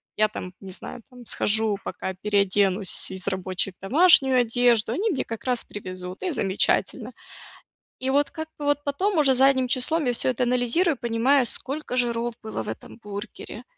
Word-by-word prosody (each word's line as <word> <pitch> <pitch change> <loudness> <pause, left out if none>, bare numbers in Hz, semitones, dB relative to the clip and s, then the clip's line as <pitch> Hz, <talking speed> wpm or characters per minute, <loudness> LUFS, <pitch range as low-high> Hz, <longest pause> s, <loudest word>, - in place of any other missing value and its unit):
Я, 215 0 +3
там, 185 -3 -8
не 190 -1 -10
знаю, 230 +5 -8
там, 250 -1 -13
схожу, 215 -1 +1
пока 190 -1 -5
переоденусь 200 -1 +2
из 190 0 -6
рабочей 190 0 -1
в - - -50
домашнюю 265 - +5
одежду, 235 -2 +2
они 410 - 0
мне, 280 - -1
как 225 -1 -7
раз, 250 -2 -1
привезут, 185 -2 -8
и 365 - -1
замечательно. 195 -8 0 0.9
И, 260 - -3
вот, 285 +1 +2
как 315 -1 -6
бы, 295 - -6
вот, 290 0 +1
потом, 350 +6 -1
уже, 270 -3 +4
задним 260 -1 +3
числом, 270 +4 0
я 245 - +1
всё 255 - +1
это 250 0 0
анализирую, 250 +7 +1
понимаю, 240 +4 +2
сколько 275 +3 -4
жиров 235 -1 0
было 220 - -5
в - - -9
этом 110 - -8
бургере, 205 0 -8
240 Hz, 175 wpm, -24 LUFS, 200-270 Hz, 0.9 s, домашнюю